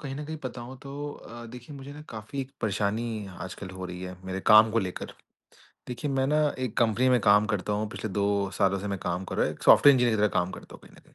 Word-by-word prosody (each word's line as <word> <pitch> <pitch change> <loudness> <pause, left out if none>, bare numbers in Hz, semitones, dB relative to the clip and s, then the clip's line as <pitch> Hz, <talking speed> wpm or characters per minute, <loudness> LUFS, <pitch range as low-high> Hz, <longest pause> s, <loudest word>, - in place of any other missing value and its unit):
कहीं 135 -2 -5
न 150 - -5
कहीं 155 +1 -5
बताऊँ 125 0 -6
तो 135 - -9 0.2
अ, 120 -3 -11
देखिए 125 +5 -10
मुझे 140 +1 -9
ना 150 - -10
काफ़ी 110 +5 -6
एक 130 - -6
परेशानी 110 +1 -1
आजकल 95 +1 -7
हो 95 0 -7
रही 90 0 -7
है 90 0 -6
मेरे 95 0 -4
काम 110 0 +8
को 115 - +1
लेकर, 95 -4 -4 0.8
देखिए 125 +4 -3
मैं 135 -1 +1
ना 150 +2 +2 0.2
एक 130 -4 -3
कंपनी 120 +3 +3
में 125 -1 +5
काम 105 0 +5
करता 105 -2 -1
हूँ, 105 +1 -1
पिछले 110 - -5
2 100 0 +1
सालों 100 0 +3
से 100 - -5
मैं 100 -1 -2
काम 90 +1 -3
कर - - -6
रहा - - +3
हूँ, - - -3
एक - - -16
सॉफ्टवेयर 145 -1 +8
इंजीनियर 120 -3 +3
की - - -1
तरह 105 - +4
काम 90 +1 -3
करता - - -11
हूँ - - -12
कहीं - - -17
न - - -16
कहीं। - - -25
110 Hz, 265 wpm, -27 LUFS, 100-130 Hz, 0.8 s, काम